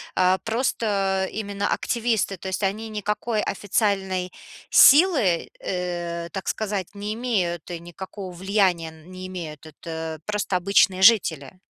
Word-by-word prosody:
а 185 0 +4
просто, 230 +1 -1 0.4
э, - - -10
именно 200 -1 -3
активисты, 225 -5 0
то 190 - -8
есть, 190 +2 -3
они 215 +3 -1
никакой 210 +1 -2
официальной 190 -3 -1 0.4
силы, 280 - +6
э, 175 -2 -4
так 195 -2 -6
сказать, 205 -3 -2
не 205 +1 -4
имеют 185 -9 -1
и 170 - -4
никакого 185 +2 -8
влияния 185 -3 +1
н 160 +2 -16
не 185 0 -8
имеют. 160 -5 -7
Это 160 0 -7
просто 210 -2 -1
обычные 190 0 +3
жители. 185 - +4
190 Hz, 135 wpm, -24 LUFS, 175-210 Hz, 0.4 s, силы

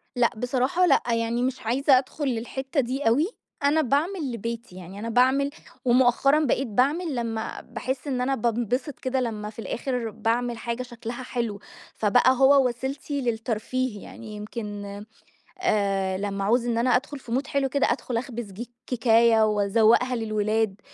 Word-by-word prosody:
لأ. 245 -1 +4
بصراحة 255 +8 +1
لأ، 280 -6 +4
يعني 230 +1 0
مش 260 0 -2
عايزة 265 +4 +4
أدخل 275 +3 -3
للحتة 265 +3 -2
دي 260 +1 -1
أوي. 275 +9 +3 0.4
أنا 295 +3 +4
باعمل 300 +2 0
لبيتي، 230 -3 -5
يعني 185 +2 -9
أنا 230 +2 -4
باعمل 260 +4 +3 0.4
ومؤخرًا 255 +4 +4
بقيت 270 0 +1
باعمل 285 - +1
لما 225 -2 -3
باحس 255 +4 -5
إن 255 -3 -1
أنا 270 +2 +1
بانبسط 240 +4 -1
كده 260 0 -1
لما 215 -3 -3
في 215 - -12
الآخر 245 0 -3
باعمل 235 +2 -1
حاجة 235 +2 -3
شكلها 240 0 -7
حلو. 235 -5 -3 0.3
فبقى 240 +4 +4
هو 270 0 +6
وسيلتي 270 +3 -4
للترفيه. 230 -1 -2
يعني 220 -2 -10
يمكن 210 -1 -6 0.8
آآ 195 - +1
لما 200 0 -3
اعوز 235 +4 +2
إن 235 -1 0
أنا 245 +2 +3
أدخل 285 +2 -3
في 250 -3 -9
مود 265 +3 0
حلو 275 -1 0
كده، 280 +1 +2
أدخل 245 - -3
اخبز 235 -3 -4
ج 215 +6 -6 0.2
كيكاية، 230 -2 +4
واذوّقها 220 +4 +3
للولاد. 215 -2 0
240 Hz, 155 wpm, -25 LUFS, 225-265 Hz, 0.8 s, هو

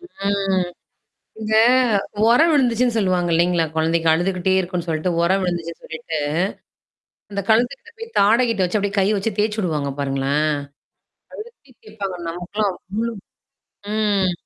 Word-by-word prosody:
ம். 195 - -1 0.7
இந்த 220 0 -1 0.7
உரம் 320 +8 +5
விழுந்துச்சுன்னு 245 -3 +2
சொல்லுவாங்க 185 -4 +1
இல்லைங்களா? 170 0 +2
குழந்தைக்கு 165 +1 +1
அழுதுக்கிட்டே 185 +2 0
இருக்கனு 180 -1 -3
சொல்லிட்டு, 160 +2 -1
உரம் 190 +3 +2
விழுந்துச்சுன்னு 170 -2 -4
சொல்லிட்டு. 160 -1 -5 1.1
அந்த 200 0 -2
கழுத்துக்கிட்ட 245 - +1
போய் 455 0 -9
தாடைகிட்ட 225 -1 +3
வச்சு 180 +5 -1
அப்படியே 205 0 -2
கை 190 - +3
வச்சு 215 +3 -1
தேய்சு 210 +1 0
விடுவாங்க 150 -7 -1
பாருங்களோன்? 135 +1 0 0.9
அழுத்தி 430 - -12
தேய்ப்பாங்க 200 -4 -6
நமக்கெல்லாம் 185 +3 -2 0.2
அவ்ளோ 230 +2 -1 0.8
ம். 205 -4 +1
195 Hz, 120 wpm, -21 LUFS, 175-220 Hz, 1.1 s, உரம்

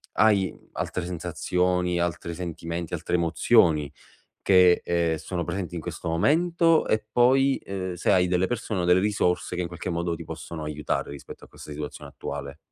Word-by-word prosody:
hai 100 -4 +3 0.2
altre 90 - -3
sensazioni, 90 +1 -1
altri 85 0 -2
sentimenti, 85 -1 -5
altre 85 +1 -1
emozioni 80 - +3 0.5
che, 90 -2 +5
ehm, 85 -2 +1
sono 85 +3 -4
presenti 90 -3 -4
in 85 - -4
questo 85 - -5
momento, 165 - +3
e 110 -1 0
poi, 135 +3 +4
uhm, 95 -2 -4
se 90 - 0
hai 90 -1 +4
delle 90 +1 +1
persone 110 -5 -2
o - - 0
delle 90 +1 +5
risorse 100 -4 0
che 90 - -1
in 90 - -2
qualche 85 +1 -5
modo 85 0 -1
ti - - -8
possono 80 -2 -7
aiutare 75 -1 -3
rispetto 70 -1 -10
a - - -18
questa - - -13
situazione 75 0 -7
attuale? 70 0 -6
90 Hz, 170 wpm, -26 LUFS, 85-95 Hz, 0.5 s, che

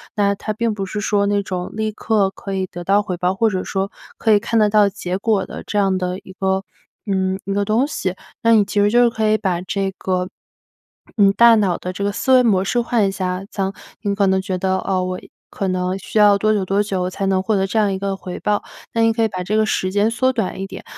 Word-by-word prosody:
那 200 -1 +2
它 205 +2 -5
并 230 +1 -1
不 195 -2 -4
是 210 - -4
说 200 0 +1
那 205 0 +1
种 180 -2 -4
立 220 0 -2
刻 210 -2 +1
可 195 0 -7
以 190 -1 -1
得 175 -1 -8
到 200 +3 +3
回 185 -3 -4
报， 180 +2 0
或 225 +3 +2
者 185 -1 -2
说 195 +1 -2 0.3
可 225 - +1
以 205 - +5
看 230 +2 0
得 210 - +5
到 210 -1 +5
结 185 -2 -4
果 210 -2 +1
的 - - -8
这 210 - -3
样 195 -2 +2
的 180 0 -2
一 190 - -14
个， 190 0 0 0.4
嗯， 190 -1 0
一 195 - -2
个 200 0 0
东 220 +6 +2
西。 190 -10 -3 0.3
那 230 0 +5
你 215 -2 +6
其 200 +1 -2
实 205 - +4
就 240 +1 +5
是 240 - +4
可 220 -1 -1
以 215 - +3
把 185 -5 -1
这 195 +1 -2
个， 185 -1 -1 0.9
你 200 -2 +6
大 235 +3 +6
脑 195 -5 +1
的 180 - -5
这 190 +2 -5
个 200 - +1
思 260 +5 +1
维 255 -1 +6
模 195 -6 +3
式 240 +5 0
换 230 -3 +1
一 - - -1
下。 185 -1 -3
这 200 - -4
样 190 +1 -2 0.3
你 205 -2 -1
可 200 -1 +2
能 190 0 +2
觉 190 -1 -3
得， 190 0 0
哦， 185 -1 -1
我 185 0 -3 0.3
可 195 - -3
能 185 0 -1
需 195 - -5
要 205 -1 +6
多 215 +2 +2
久 205 -2 0
多 195 +2 +1
久 185 -3 -2
才 195 +1 -3
能 190 -1 +2
获 215 +3 +1
得 190 - +1
这 220 - -3
样 205 -2 +2
一 190 - -2
个 195 0 -2
回 185 -1 -7
报， 210 -1 0 0.3
那 230 - +1
你 225 0 +4
可 225 - -1
以 - - +3
把 185 -3 -5
这 210 +4 0
个 220 - +3
时 185 -3 -1
间 205 +2 +2
缩 260 +3 +2
短 225 -6 -3
一 - - -2
点， 195 - -9
200 Hz, 290 characters per minute, -20 LUFS, 190-215 Hz, 0.9 s, 你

